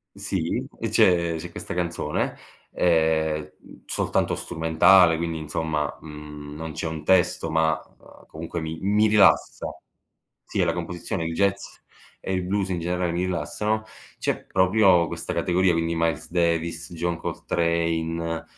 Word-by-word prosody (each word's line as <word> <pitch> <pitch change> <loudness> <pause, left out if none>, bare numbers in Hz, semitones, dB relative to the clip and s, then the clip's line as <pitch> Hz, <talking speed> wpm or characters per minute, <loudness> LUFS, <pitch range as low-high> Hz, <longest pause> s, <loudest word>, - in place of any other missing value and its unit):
Sì, 95 -4 -2
e - - -1
c'è 85 -2 +3
c'è 80 - -7
questa - - -6
canzone, 85 -3 -2 0.4
ehm, 80 -2 +1
mhmm, - - -16
soltanto - - 0
strumentale. 80 +2 +4
Quindi, 80 -1 -3
insomma, 75 -1 -2
mhmm, 75 -1 -9
non 80 0 -6
c'è 80 +2 -4
un 80 -1 -6
testo, 95 -2 +2
ma, 80 -1 +2 0.2
uhm, - - -18
comunque, 85 +1 -6
mi 80 0 -5
mi 105 +3 +3
rilassa. 105 -2 +4 0.8
Sì, - - -3
è - - +4
la - - +1
composizione, 85 -1 -4
il 80 0 -3
jazz 100 +2 0 0.4
e 95 - -4
il 90 -1 0
blues 95 +1 -1
in 90 -2 -1
generale, 90 0 -1
mi 90 +2 -1
rilassano. 95 +6 -1 0.3
C'è - - -2
proprio 95 -2 +4
questa - - -5
categoria, 90 +1 +2
quindi 85 0 0
Miles 80 0 -1
Davis, 85 -1 0
John 85 0 -1
Coltrane, 85 -1 -1
85 Hz, 145 wpm, -24 LUFS, 80-90 Hz, 0.8 s, strumentale